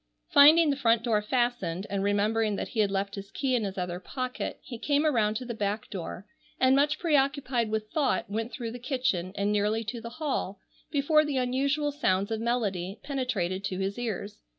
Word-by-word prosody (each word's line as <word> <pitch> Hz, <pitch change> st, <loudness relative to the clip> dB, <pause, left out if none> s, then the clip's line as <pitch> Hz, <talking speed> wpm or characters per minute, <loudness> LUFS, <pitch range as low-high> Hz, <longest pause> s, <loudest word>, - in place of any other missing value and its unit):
Finding 305 Hz, +2 st, +7 dB
the -, -, 0 dB
front 230 Hz, -4 st, +3 dB
door 220 Hz, -3 st, +2 dB
fastened, 240 Hz, -6 st, -1 dB
and 195 Hz, -1 st, -2 dB
remembering 210 Hz, +1 st, +1 dB
that -, -, -4 dB
he 225 Hz, -, -4 dB
had 205 Hz, -2 st, +4 dB
left 195 Hz, 0 st, -2 dB
his 200 Hz, 0 st, -7 dB
key 265 Hz, +4 st, -1 dB
in 235 Hz, -, +1 dB
his 195 Hz, -1 st, -4 dB
other 180 Hz, -1 st, -3 dB
pocket, 255 Hz, +5 st, -4 dB
he 235 Hz, -3 st, -8 dB
came 290 Hz, +4 st, +1 dB
around 220 Hz, -8 st, +2 dB
to 250 Hz, -, -4 dB
the 240 Hz, -, -4 dB
back 210 Hz, 0 st, -3 dB
door, 185 Hz, 0 st, -6 dB, 0.3 s
and 260 Hz, 0 st, +5 dB
much 295 Hz, +2 st, +3 dB
preoccupied 275 Hz, -7 st, +1 dB
with 215 Hz, 0 st, -3 dB
thought 285 Hz, -11 st, +1 dB
went 225 Hz, +4 st, -3 dB
through 230 Hz, -1 st, -5 dB
the 245 Hz, -, -7 dB
kitchen 245 Hz, -, -1 dB
and 200 Hz, +1 st, 0 dB
nearly 210 Hz, +2 st, +1 dB
to 225 Hz, +2 st, -5 dB
the 235 Hz, -, -6 dB
hall 265 Hz, -, -3 dB, 0.3 s
before 305 Hz, +1 st, +3 dB
the 295 Hz, -3 st, -2 dB
unusual 275 Hz, +4 st, +1 dB
sounds 200 Hz, -8 st, 0 dB
of 220 Hz, 0 st, -1 dB
melody 205 Hz, -5 st, -1 dB
penetrated 225 Hz, -10 st, -2 dB
to 195 Hz, -2 st, -3 dB
his 195 Hz, +4 st, -2 dB
ears. 210 Hz, -3 st, -4 dB
230 Hz, 195 wpm, -28 LUFS, 200-265 Hz, 0.3 s, Finding